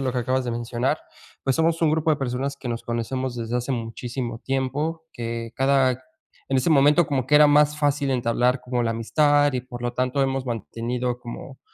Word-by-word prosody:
lo 130 -1 0
que 125 - -1
acabas 130 +2 0
de 120 - -2
mencionar. 120 +4 -1 0.5
Pues, 135 - +2
somos 165 +2 +1
un 160 -2 +3
grupo 160 0 +1
de 155 - +3
personas 135 +1 -2
que 135 - -7
nos 115 -1 -3
conocemos 120 +2 -3
desde 115 0 -2
hace 125 +2 -3
muchísimo 120 0 -4
tiempo, 140 +5 -2
que 115 -1 -5
cada 130 -1 +2 0.5
En 135 - +3
ese 130 +5 +2
momento, 150 +2 +5
como 135 -4 -1
que 150 - +2
era 150 0 +8
más 150 +1 +4
fácil 145 -1 +1
entablar 125 +1 +1
como 125 -1 -1
la 115 - 0
amistad 145 +5 +3
y, 130 - -1
por 120 -1 -9
lo 120 0 -1
tanto, 130 +2 0
hemos 135 -1 -1
mantenido 120 +2 -3
como 125 +2 -9
130 Hz, 200 wpm, -24 LUFS, 120-140 Hz, 0.5 s, era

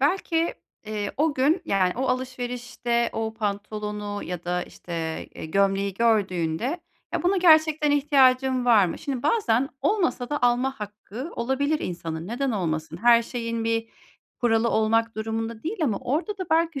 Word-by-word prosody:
belki, 330 +2 +1 0.3
eee, 210 -1 -3
o 305 +1 +2
gün, 300 +8 +2
yani, 190 - +2
o 255 - -1
alışverişte 245 -2 -2
o 220 0 -3
pantolonu 210 -1 -4
ya 180 -1 -5
da, 180 0 -1
işte, 175 - -11 0.4
e, - - -8
gömleği 195 +2 +1
gördüğünde 210 - +1 0.3
ya, - - -1
buna 370 +3 +2
gerçekten 315 -3 +5
ihtiyacım 265 -3 +3
var 220 -6 +6
mı? - - -5
Şimdi 270 -5 -4
bazen 275 - +2
olmasa 345 - 0
da 295 - -2
alma 245 +1 +1
hakkı 210 - -7
olabilir 275 +5 0
insanın, 165 -2 -4
neden 250 +6 -1
olmasın? 160 -6 -2
Her 235 +4 +5
şeyin 230 -1 -3
bir 225 0 0 0.5
kuralı 230 -1 +3
olmak 225 +1 +2
durumunda 225 +1 -3
değil, 365 +8 -3
ama 215 -8 0
orada 350 - -2
da 370 - -4
belki 320 -3 +2
235 Hz, 150 wpm, -25 LUFS, 210-280 Hz, 0.5 s, var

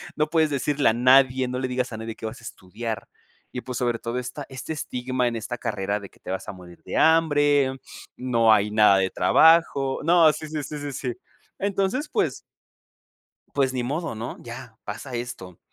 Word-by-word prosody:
No 150 0 0
puedes 160 -2 +3
decirle 145 +1 +1
a 110 - +2
nadie, 130 +1 +4
no 125 0 -3
le 130 - -1
digas 125 0 -2
a - - -5
nadie 110 0 -6
qué 110 - -9
vas 120 +2 -8
a - - -19
estudiar 110 +3 -6 0.4
y 125 - -5
pues, 125 -2 -6
sobre 120 -2 0
todo 120 +2 -3
esta 125 +3 -6
este 130 +4 -6
estigma 125 -3 -2
en 120 - -2
esta 120 +2 -5
carrera 100 -2 -2
de 100 - -10
que - - -25
te - - -11
vas 95 - -4
a - - -5
morir 90 -2 -14
de - - -4
hambre, 145 -4 +3 0.4
no 115 -3 +3
hay 105 0 +2
nada 105 -2 +5
de 95 - +1
trabajo. 140 - +4
No, 165 -1 +6
sí, 155 +1 -7
sí, 155 -1 -3
sí, 150 - -6
sí, 145 0 -5
sí. 125 -1 -3 0.5
Entonces, 200 +8 -1
pues - - -1 1.1
Pues 135 -2 +1
ni 125 -1 -1
modo, 150 +3 -3
¿no? 115 +2 -6
Ya 120 -1 -10
pasa 125 +5 -6
esto, 120 -7 -7
125 Hz, 200 wpm, -24 LUFS, 115-145 Hz, 1.1 s, No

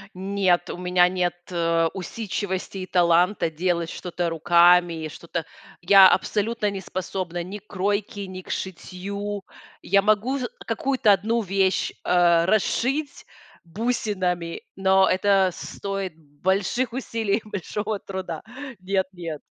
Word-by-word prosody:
Нет, 190 -2 +1
у - - -4
меня 180 0 +3
нет, 180 -1 0 0.2
э, 165 -1 +2
усидчивости 195 -1 -4
и 185 - -5
таланта 175 +1 +3
делать 170 +1 -1
что-то 175 -1 -3
руками, 170 0 +4
и - - -3
что-то 170 +1 -6 0.4
я 195 +1 +8
абсолютно 215 0 0
не 195 -1 -5
способна 180 -1 -4
ни 195 +4 -7
к 210 - -24
кройке, 200 +1 -2
ни 185 0 -7
к - - -15
шитью. 195 +2 -5 0.4
Я 200 +1 +3
могу 215 +6 +2
ж 250 - -2 0.2
какую-то 230 -2 +2
одну 220 +4 +1
вещь, 195 0 +1
а, 175 -1 +4
расшить 260 +8 0 0.4
бусинами, 185 -4 -2
но 190 0 +4
это 190 0 +3
стоит 195 -4 -5
больших 190 - -1
усилий 225 -5 -1
и 215 - -14
большого 210 +2 -3
труда. 185 -4 -6 0.4
Нет-нет. 185 -5 -3
190 Hz, 125 wpm, -24 LUFS, 175-205 Hz, 0.4 s, я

